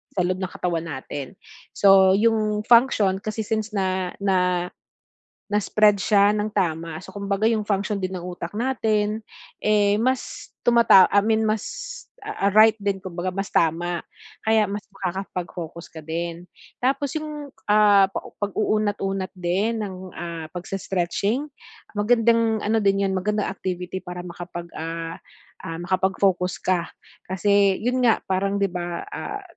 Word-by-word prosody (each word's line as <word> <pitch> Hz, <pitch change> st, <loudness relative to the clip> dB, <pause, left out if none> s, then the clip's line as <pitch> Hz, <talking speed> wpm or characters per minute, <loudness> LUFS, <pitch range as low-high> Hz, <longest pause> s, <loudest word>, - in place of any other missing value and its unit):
sa 190 Hz, -, +2 dB
loob 185 Hz, +1 st, -1 dB
ng 185 Hz, -, -2 dB
katawan 170 Hz, -2 st, -2 dB
natin. 140 Hz, +3 st, -6 dB, 0.4 s
So 195 Hz, -1 st, +6 dB
'yung 215 Hz, -1 st, +1 dB
function 230 Hz, -6 st, +4 dB
kasi, 215 Hz, +1 st, -3 dB
since 220 Hz, 0 st, -2 dB
na 185 Hz, -2 st, 0 dB
na 180 Hz, -2 st, +2 dB, 0.8 s
na 205 Hz, -, +2 dB
spread 210 Hz, 0 st, +4 dB
siya 205 Hz, -1 st, +4 dB
ng 210 Hz, 0 st, -1 dB
tama, 165 Hz, -2 st, -1 dB
so 190 Hz, -, -11 dB
kumbaga 200 Hz, +1 st, -1 dB
'yung 225 Hz, -2 st, +1 dB
function 205 Hz, 0 st, 0 dB
din 185 Hz, 0 st, -2 dB
ng 175 Hz, -, -7 dB
utak 175 Hz, -1 st, -6 dB
natin, 220 Hz, -3 st, 0 dB, 0.4 s
eh, 205 Hz, -1 st, +3 dB
mas 255 Hz, +2 st, -2 dB, 0.2 s
tumata 235 Hz, -6 st, +7 dB
I 205 Hz, -, +6 dB
mean 220 Hz, 0 st, +2 dB
mas, 215 Hz, -1 st, 0 dB, 0.6 s
ah, 200 Hz, -, -1 dB
right 215 Hz, +1 st, +7 dB
din 200 Hz, -1 st, 0 dB
kumbaga, 185 Hz, 0 st, -3 dB
mas 195 Hz, +1 st, -3 dB
tama, 170 Hz, +1 st, +1 dB, 0.4 s
kaya 220 Hz, -1 st, +3 dB
mas 205 Hz, 0 st, -4 dB
makakapag-focus 175 Hz, -3 st, -5 dB
ka 160 Hz, -, -8 dB
din. 170 Hz, +2 st, -4 dB, 0.4 s
Tapos 275 Hz, +2 st, 0 dB
'yung, 300 Hz, -2 st, -7 dB, 0.2 s
ah, 205 Hz, -2 st, +6 dB, 0.4 s
pag-uunat-unat 205 Hz, -2 st, -1 dB
din 190 Hz, +6 st, 0 dB
ng, 195 Hz, -2 st, -5 dB, 0.2 s
ah, 165 Hz, -2 st, -5 dB
pagse-stretching, 195 Hz, -, -2 dB, 0.5 s
magandang 230 Hz, +1 st, +3 dB
ano 220 Hz, +2 st, +2 dB
din 195 Hz, 0 st, +2 dB
'yun, 190 Hz, -, -1 dB
magandang 210 Hz, +2 st, 0 dB
activity 185 Hz, -1 st, -4 dB
para 180 Hz, 0 st, -7 dB
makapag 175 Hz, -1 st, -7 dB
ah 165 Hz, 0 st, -4 dB, 0.5 s
ah, 165 Hz, 0 st, -5 dB
makapag-focus 185 Hz, 0 st, +1 dB
ka, 180 Hz, -2 st, 0 dB, 0.4 s
kasi 200 Hz, 0 st, +3 dB
'yun 250 Hz, +3 st, 0 dB
nga, 230 Hz, -2 st, +5 dB
parang 195 Hz, +1 st, 0 dB
'di 200 Hz, -, +2 dB
ba, 175 Hz, -1 st, -4 dB
ah, 410 Hz, 0 st, -5 dB
195 Hz, 140 wpm, -23 LUFS, 180-215 Hz, 0.8 s, tumata